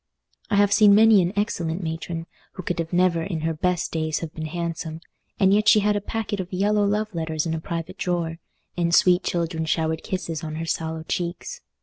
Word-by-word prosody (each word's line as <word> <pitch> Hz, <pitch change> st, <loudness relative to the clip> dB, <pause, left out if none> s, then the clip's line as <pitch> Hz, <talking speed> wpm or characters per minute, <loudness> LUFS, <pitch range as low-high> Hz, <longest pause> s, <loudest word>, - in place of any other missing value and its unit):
I 210 Hz, -, +1 dB
have 200 Hz, 0 st, +4 dB
seen 205 Hz, -2 st, +7 dB
many 220 Hz, -2 st, +7 dB
an 175 Hz, 0 st, 0 dB
excellent 175 Hz, -4 st, -1 dB
matron, 165 Hz, +1 st, -4 dB, 0.3 s
who 185 Hz, -, -7 dB
could 175 Hz, 0 st, -3 dB
have 165 Hz, -1 st, -3 dB
never 180 Hz, -2 st, +2 dB
in 165 Hz, -2 st, -3 dB
her 165 Hz, +1 st, -1 dB
best 180 Hz, +2 st, -1 dB
days 160 Hz, -1 st, -1 dB
have 165 Hz, -2 st, -6 dB
been 155 Hz, -1 st, -5 dB
handsome, 165 Hz, -1 st, -4 dB, 0.4 s
and 195 Hz, 0 st, +5 dB
yet 210 Hz, +1 st, +4 dB
she 215 Hz, -, +6 dB
had 210 Hz, +1 st, +2 dB
a 205 Hz, -, -1 dB
packet 215 Hz, -1 st, -3 dB
of 185 Hz, -1 st, -5 dB
yellow 205 Hz, +3 st, +2 dB
love 210 Hz, +1 st, -1 dB
letters 160 Hz, -1 st, -2 dB
in 165 Hz, -, -1 dB
a 160 Hz, -, -3 dB
private 165 Hz, 0 st, -5 dB
drawer, 170 Hz, -2 st, -2 dB, 0.4 s
and 170 Hz, -1 st, +2 dB
sweet 180 Hz, -2 st, +5 dB
children 170 Hz, -2 st, -2 dB
showered 160 Hz, 0 st, 0 dB
kisses 170 Hz, -4 st, -4 dB
on 155 Hz, -1 st, -5 dB
her 165 Hz, +1 st, -4 dB
sallow 160 Hz, 0 st, -3 dB
cheeks. 175 Hz, -, -4 dB
170 Hz, 210 wpm, -24 LUFS, 160-200 Hz, 0.4 s, seen